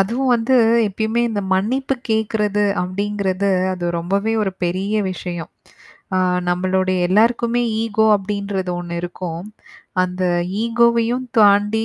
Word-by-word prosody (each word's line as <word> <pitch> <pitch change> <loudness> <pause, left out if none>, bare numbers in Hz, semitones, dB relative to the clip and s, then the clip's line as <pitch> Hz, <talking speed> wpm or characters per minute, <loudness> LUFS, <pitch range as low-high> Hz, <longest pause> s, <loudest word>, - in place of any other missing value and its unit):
அதுவும் 245 +7 0
வந்து 240 +3 +2 0.3
எப்பயுமே 220 +4 -1
இந்த 205 -2 -2
மன்னிப்பு 260 +8 0 0.2
கேட்கறது 210 -1 0 0.2
அப்டிங்கிறது, 200 +1 -1 0.2
அது 180 -1 -5
ரொம்பவே 200 +6 -1
ஒரு 195 -2 -1
பெரிய 185 +4 -2 0.2
விஷயம். 175 -2 -6 0.7
ஆ - - +3 0.3
நம்பளுடைய 185 +1 0
எல்லாருக்குமே 235 +4 +2 0.2
ஈகோ 220 -1 +1
அப்டின்றது 200 -1 -3
ஒண்ணு 175 -1 -6
இருக்கும். 175 -1 -6 0.6
அந்த 185 0 -3 0.4
ஈகோவையும் 235 +1 +2
தாண்டி 210 +1 +4
205 Hz, 110 wpm, -19 LUFS, 185-225 Hz, 0.7 s, தாண்டி